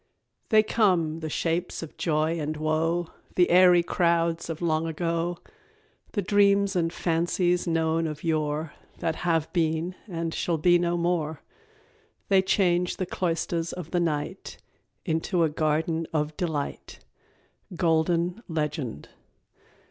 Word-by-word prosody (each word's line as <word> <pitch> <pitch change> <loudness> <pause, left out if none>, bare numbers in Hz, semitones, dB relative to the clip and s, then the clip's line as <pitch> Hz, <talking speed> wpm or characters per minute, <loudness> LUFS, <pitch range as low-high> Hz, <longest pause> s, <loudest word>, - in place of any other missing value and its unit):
_ - - -42
"They 215 -2 +6
come, 180 -8 +1
the 160 -1 -4
shapes 170 +3 -2
of 160 - -10
joy 160 +1 0
and 155 0 -3
woe, 160 +2 0 0.3
The 180 -1 +3
airy 180 -1 +6
crowds 170 -1 +1
of 165 -1 -4
long 165 -1 0
ago, 170 +1 -2 0.8
The 205 - -1
dreams 200 0 +3
and 165 -2 +1
fancies 175 +1 0
known 165 0 +1
of 150 -1 -6
yore 155 -1 -1 0.2
That 165 -1 -2
have 165 -3 0
been 165 +1 0
and 165 -3 -3
shall 170 -2 -1
be 175 +3 +4
no 175 0 0
more; 170 -3 -1 0.9
They 195 -1 +5
change 180 -2 +1
the 185 - -1
cloisters 170 -1 -2
of 175 -3 -7
the 180 - +1
night 155 -4 -3 0.5
Into 165 +2 0
a 160 - +2
garden 160 +2 0
of 150 -1 -1
delight." 155 -5 -4 0.8
_Golden 170 +3 +1
Legend. 150 - -3
165 Hz, 135 wpm, -26 LUFS, 160-175 Hz, 0.9 s, They